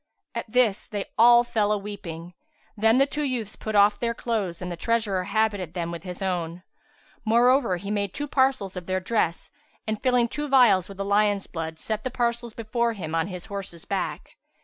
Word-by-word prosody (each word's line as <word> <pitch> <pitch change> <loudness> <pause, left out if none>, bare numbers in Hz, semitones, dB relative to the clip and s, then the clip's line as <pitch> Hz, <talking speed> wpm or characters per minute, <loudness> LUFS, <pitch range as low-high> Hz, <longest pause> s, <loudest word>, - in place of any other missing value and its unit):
At 215 - -5
this, 230 -5 +2
they 205 -2 -5
all 240 +1 +7
fell 220 -4 0
a 210 - +2
weeping; 185 -4 -7 0.4
then 225 +2 +4
the 270 - +5
two 295 +2 -4
youths 245 -7 -2
put 215 -1 -5
off 205 0 +5
their 235 -1 -1
clothes 210 -9 -2
and 180 -1 -5
the - - -3
treasurer 205 -1 0
habited 200 -4 0
them 170 -1 -2
with 170 -2 -6
his 180 +1 -7
own. 175 -2 -2 0.6
Moreover 235 -2 +3
he 200 +3 -6
made 200 -2 -1
two 290 +8 -4
parcels 260 -9 +1
of 180 -2 -7
their 185 0 0
dress 185 -3 -1 0.3
and, 215 -1 -3
filling 250 -2 +3
two 295 +5 -4
vials 245 - +5
with 195 - -10
the 195 - -3
lion's 205 0 +2
blood, 160 -1 -5
set 215 -1 -3
the 255 - -2
parcels 235 -2 -2
before 235 +1 -1
him 165 -7 -6
on 165 0 +1
his 180 -3 -7
horse's 195 -4 -6
back. - - -4
205 Hz, 195 wpm, -25 LUFS, 185-235 Hz, 0.6 s, all